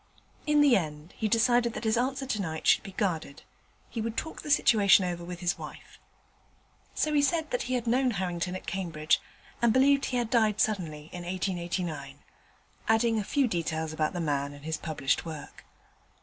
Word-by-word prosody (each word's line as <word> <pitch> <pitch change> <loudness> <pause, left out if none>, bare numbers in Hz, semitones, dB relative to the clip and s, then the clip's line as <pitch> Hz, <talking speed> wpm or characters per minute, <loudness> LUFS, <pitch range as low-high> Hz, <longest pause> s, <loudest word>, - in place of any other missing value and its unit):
In 300 0 +4
the 285 -4 +6
end 155 -2 -3
he 220 - -1
decided 235 +1 +3
that - - -5
his 220 0 +2
answer 265 +3 -1
tonight 190 -11 -3
should - - +5
be 195 - -10
guarded; 165 -8 -2 0.4
he 230 - -4
would 225 0 -4
talk 320 - -4
the - - -8
situation 205 -8 +5
over 175 -1 -3
with 175 +1 -7
his 175 +1 0
wife. 155 -1 -10 1.0
So 305 - 0
he 290 - +4
said 320 +1 0
that 250 - 0
he 255 - +1
had 245 -1 -2
known 255 +3 +2
Harrington 180 -3 -2
at 185 - -7
Cambridge, 165 -5 0 0.4
and 235 -1 +4
believed 275 +3 +4
he 250 - -1
had 235 -2 -1
died 220 -4 +3
suddenly 160 -8 -1
in 175 - -6
1889, 175 -5 -3 0.7
adding 225 0 +3
a - - -1
few 275 +6 +1
details 160 -4 -2
about 155 -1 0
the 180 - -3
man 145 -3 -1
and 145 +1 -13
his 160 0 -2
published 155 -4 -1
work. 160 -3 -9
190 Hz, 185 wpm, -28 LUFS, 160-240 Hz, 1.0 s, the